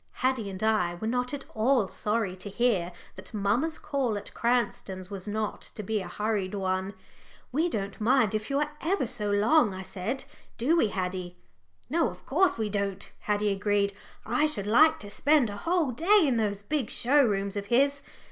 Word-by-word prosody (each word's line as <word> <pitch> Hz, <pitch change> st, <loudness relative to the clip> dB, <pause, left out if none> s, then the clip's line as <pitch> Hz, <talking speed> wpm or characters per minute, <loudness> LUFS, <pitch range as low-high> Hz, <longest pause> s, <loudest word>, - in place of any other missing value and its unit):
Haddie 255 Hz, -5 st, 0 dB
and 190 Hz, +1 st, -6 dB
I 215 Hz, -6 st, +2 dB
were 195 Hz, -, -6 dB
not 250 Hz, +2 st, 0 dB
at 285 Hz, -1 st, -5 dB
all 225 Hz, -1 st, +2 dB
sorry 210 Hz, -1 st, -1 dB
to 195 Hz, +3 st, -7 dB
hear 200 Hz, -5 st, +1 dB, 0.3 s
that -, -, -10 dB
mamma's 230 Hz, +11 st, 0 dB
call 260 Hz, -7 st, -1 dB
at 205 Hz, -, -9 dB
Cranston's 205 Hz, -5 st, -1 dB
was 195 Hz, 0 st, -7 dB
not 215 Hz, 0 st, -2 dB
to 210 Hz, -, -5 dB
be 215 Hz, +2 st, -1 dB
a 185 Hz, -, -6 dB
hurried 205 Hz, 0 st, -2 dB
one. 190 Hz, 0 st, -2 dB, 0.6 s
"We 315 Hz, +7 st, +1 dB
don't 200 Hz, -, -4 dB
mind 235 Hz, -2 st, +3 dB
if 215 Hz, 0 st, -2 dB
you 275 Hz, -, +1 dB
are 300 Hz, -, -1 dB
ever 360 Hz, -2 st, +1 dB
so 210 Hz, -2 st, -3 dB
long," 210 Hz, +2 st, +3 dB
I 190 Hz, -, -6 dB
said; 215 Hz, +9 st, -3 dB, 0.3 s
"do 280 Hz, +8 st, +2 dB
we, 330 Hz, -, +4 dB
Haddie?" 180 Hz, -2 st, -4 dB, 0.5 s
"No, 325 Hz, +5 st, +1 dB
of -, -, -13 dB
course 355 Hz, +3 st, +2 dB
we 220 Hz, -1 st, -1 dB
don't," 200 Hz, -1 st, -3 dB
Haddie 210 Hz, 0 st, 0 dB
agreed. 200 Hz, 0 st, +1 dB, 0.3 s
"I 245 Hz, +7 st, +2 dB
should 205 Hz, -10 st, -1 dB
like 315 Hz, +10 st, +5 dB
to 205 Hz, -, -7 dB
spend 285 Hz, -2 st, +3 dB
a 205 Hz, -, -6 dB
whole 330 Hz, -, +1 dB
day 380 Hz, -, +4 dB
in 260 Hz, -5 st, +2 dB
those 205 Hz, -2 st, -1 dB
big 275 Hz, -1 st, -1 dB
show 280 Hz, +4 st, +3 dB
rooms 200 Hz, -4 st, 0 dB
of 200 Hz, 0 st, -4 dB
his. 280 Hz, +5 st, +3 dB
215 Hz, 190 wpm, -28 LUFS, 200-265 Hz, 0.6 s, like